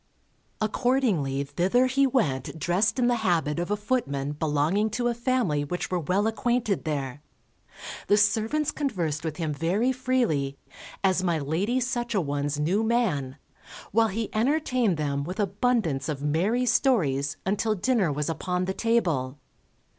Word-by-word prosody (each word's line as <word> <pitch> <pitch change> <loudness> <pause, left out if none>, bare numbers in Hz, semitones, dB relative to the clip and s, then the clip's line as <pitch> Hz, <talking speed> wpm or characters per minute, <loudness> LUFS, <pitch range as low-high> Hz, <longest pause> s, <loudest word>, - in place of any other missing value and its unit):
Accordingly 215 - +1
thither 180 - +2
he 270 +2 +3
went 160 - -1
dressed 190 - +1
in 250 - +2
the 240 0 +2
habit 165 -6 +1
of 175 - -2
a 210 - 0
footman 175 - -1
belonging 155 +8 +1
to 240 +3 -1
a - - 0
family 235 - 0
which 180 +6 -4
were 180 - +1
well 185 +6 0
acquainted 225 -3 0
there; 145 -3 -3 0.9
the 205 - +4
servants 220 +9 +2
conversed 175 - -2
with 160 -2 -4
him 160 -3 -2
very 180 - +1
freely, 240 - 0 0.5
as 185 -1 +2
my 170 -3 +1
Lady 170 - 0
Such 240 -2 -2
a - - +3
one's 145 -1 -2
new 180 +9 +1
man, 185 - 0 0.5
while 225 +2 +4
he 220 +2 -3
entertained 250 - +1
them 140 -2 -1
with 180 +7 -6
abundance 195 - 0
of 145 -2 -4
merry 190 +12 +1
stories, 145 - +1
until 210 +3 0
dinner 210 - +1
was 145 +1 -2
upon 180 +2 -2
the 190 - -2
table. 165 - 0
190 Hz, 150 wpm, -26 LUFS, 150-235 Hz, 0.9 s, the